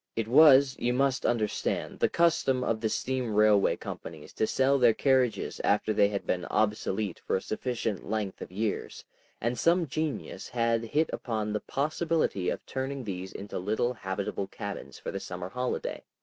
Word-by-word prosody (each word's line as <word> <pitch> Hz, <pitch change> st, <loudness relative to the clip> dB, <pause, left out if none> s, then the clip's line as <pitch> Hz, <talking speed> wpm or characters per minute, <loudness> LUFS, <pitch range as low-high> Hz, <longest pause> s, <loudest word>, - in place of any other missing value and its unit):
It 115 Hz, -1 st, -1 dB
was, 140 Hz, 0 st, +7 dB
you 120 Hz, +1 st, +1 dB
must 135 Hz, +1 st, +1 dB
understand, 110 Hz, -3 st, -1 dB
the -, -, +3 dB
custom 145 Hz, -6 st, +2 dB
of 115 Hz, -3 st, -1 dB
the 110 Hz, -, +1 dB
steam 125 Hz, -2 st, -2 dB
railway 105 Hz, -1 st, +4 dB
companies 80 Hz, -2 st, -8 dB
to 110 Hz, -, 0 dB
sell 135 Hz, +3 st, +2 dB
their 120 Hz, -3 st, +5 dB
carriages 130 Hz, -4 st, +1 dB
after 105 Hz, +1 st, +2 dB
they 100 Hz, -1 st, +4 dB
had 100 Hz, -1 st, -3 dB
been 90 Hz, -2 st, -1 dB
obsolete 105 Hz, -2 st, -1 dB
for -, -, +2 dB
a -, -, +1 dB
sufficient 110 Hz, -4 st, -3 dB
length 105 Hz, -3 st, -2 dB
of -, -, -7 dB
years, 105 Hz, +3 st, -3 dB, 0.3 s
and 120 Hz, +1 st, -1 dB
some 170 Hz, +1 st, +3 dB
genius 155 Hz, +1 st, -4 dB
had 115 Hz, -1 st, +1 dB
hit 150 Hz, +8 st, +1 dB
upon 110 Hz, -3 st, -2 dB
the 105 Hz, -, 0 dB
possibility 155 Hz, -, 0 dB
of -, -, -4 dB
turning 135 Hz, 0 st, -4 dB
these 95 Hz, -3 st, -5 dB
into 100 Hz, -1 st, -6 dB
little 110 Hz, +6 st, 0 dB
habitable 100 Hz, -2 st, -3 dB
cabins 100 Hz, 0 st, -7 dB
for -, -, -6 dB
the 100 Hz, -, -4 dB
summer 90 Hz, -1 st, -6 dB
holiday. 125 Hz, +3 st, -3 dB
115 Hz, 170 wpm, -29 LUFS, 105-130 Hz, 0.3 s, was